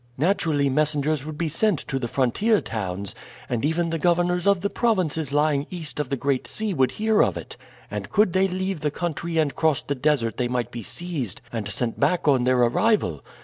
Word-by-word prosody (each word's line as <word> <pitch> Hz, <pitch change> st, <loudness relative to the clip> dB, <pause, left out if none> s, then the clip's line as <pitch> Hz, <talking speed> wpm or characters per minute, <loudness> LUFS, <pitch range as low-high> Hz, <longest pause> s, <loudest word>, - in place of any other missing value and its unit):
Naturally 160 Hz, -3 st, +2 dB
messengers 150 Hz, +1 st, +1 dB
would 155 Hz, -1 st, -6 dB
be 170 Hz, -, -1 dB
sent 180 Hz, +4 st, +1 dB
to 135 Hz, -, -3 dB
the 120 Hz, -, -2 dB
frontier 140 Hz, -, +2 dB
towns, 100 Hz, -2 st, -4 dB, 0.3 s
and 120 Hz, -1 st, -2 dB
even 165 Hz, +3 st, +1 dB
the 165 Hz, -, -1 dB
governors 175 Hz, +2 st, +2 dB
of 200 Hz, -3 st, +4 dB
the 200 Hz, -, 0 dB
provinces 170 Hz, -, 0 dB
lying 145 Hz, -1 st, +2 dB
east 165 Hz, -5 st, -6 dB
of 145 Hz, -4 st, -2 dB
the 140 Hz, -, -1 dB
Great 135 Hz, 0 st, -1 dB
Sea 215 Hz, -2 st, -2 dB
would 130 Hz, -5 st, +2 dB
hear 220 Hz, 0 st, +2 dB
of -, -, +2 dB
it; -, -, -8 dB, 0.4 s
and -, -, -4 dB
could 205 Hz, -4 st, +3 dB
they 190 Hz, +1 st, +3 dB
leave 190 Hz, -1 st, -2 dB
the 150 Hz, 0 st, 0 dB
country 170 Hz, +1 st, -3 dB
and 155 Hz, -3 st, +1 dB
cross 160 Hz, -3 st, +1 dB
the 140 Hz, -, -2 dB
desert 135 Hz, -4 st, 0 dB
they 125 Hz, -, 0 dB
might 120 Hz, -1 st, -2 dB
be 120 Hz, -, -6 dB
seized 150 Hz, -, -3 dB
and 110 Hz, -3 st, -3 dB
sent 115 Hz, +3 st, -3 dB
back 155 Hz, +4 st, +1 dB
on 130 Hz, -4 st, +4 dB
their 130 Hz, 0 st, +3 dB
arrival. 120 Hz, -, +2 dB
150 Hz, 205 wpm, -24 LUFS, 130-175 Hz, 0.4 s, of